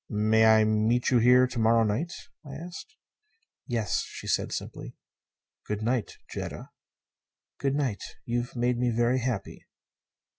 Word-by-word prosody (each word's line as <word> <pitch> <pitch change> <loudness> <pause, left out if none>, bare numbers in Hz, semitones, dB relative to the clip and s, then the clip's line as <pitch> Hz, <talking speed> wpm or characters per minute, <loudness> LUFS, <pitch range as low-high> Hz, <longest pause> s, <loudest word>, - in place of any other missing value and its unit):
"May 110 +1 +3
I 110 0 +6
meet 110 +4 +2
you 125 - +5
here 125 +2 +6
to 125 -1 -4
morrow 115 +1 +4
night?" 115 +11 -1 0.3
I 140 -2 -9
asked. 180 - -9 0.7
"Yes," 115 -6 0
she - - -9
said - - 0
simply. - - -6 0.7
"Good 105 0 -3
night 120 0 -1
Jetta." - - -7 0.9
"Good 135 0 0
night. 130 -9 -1 0.2
You 120 +1 0
you've 120 +2 -6
made 120 0 0
me 125 0 +2
very 120 +2 +2
happy." 120 -5 -4
120 Hz, 145 wpm, -27 LUFS, 110-130 Hz, 0.9 s, I